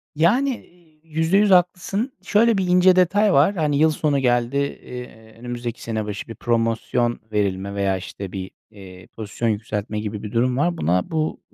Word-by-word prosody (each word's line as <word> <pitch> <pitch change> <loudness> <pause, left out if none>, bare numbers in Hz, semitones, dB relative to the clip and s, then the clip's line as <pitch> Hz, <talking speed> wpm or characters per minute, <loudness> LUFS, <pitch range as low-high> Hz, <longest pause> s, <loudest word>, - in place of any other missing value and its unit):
Yani, 215 - +3
eee, 170 -3 -23
%100 165 +6 +2
haklısın. 185 +7 +1
Şöyle 220 +3 +3
bir 190 -1 0
ince 180 +1 +5
detay 195 +3 +3
var. 150 +9 +4
Hani, 150 -4 0
yıl 155 +2 +4
sonu 150 -2 0
geldi, 120 0 +1
eee, 125 -5 -6
önümüzdeki 120 -1 -6
sene 110 -2 -3
başı 105 -1 -6
bir 115 - -8
promosyon 120 +1 0
verilme 100 -1 -1
veya 100 -1 0
işte 95 +1 -8
bir, 95 -1 -6 0.2
eee, 95 -3 -13
pozisyon 115 +1 -3
yükseltme 105 0 -3
gibi 105 -1 -5
bir 105 - -6
durum 125 +2 +1
var. 170 +4 +1
Buna 90 - 0
bu 155 -1 -1
125 Hz, 165 wpm, -22 LUFS, 105-175 Hz, 0.2 s, ince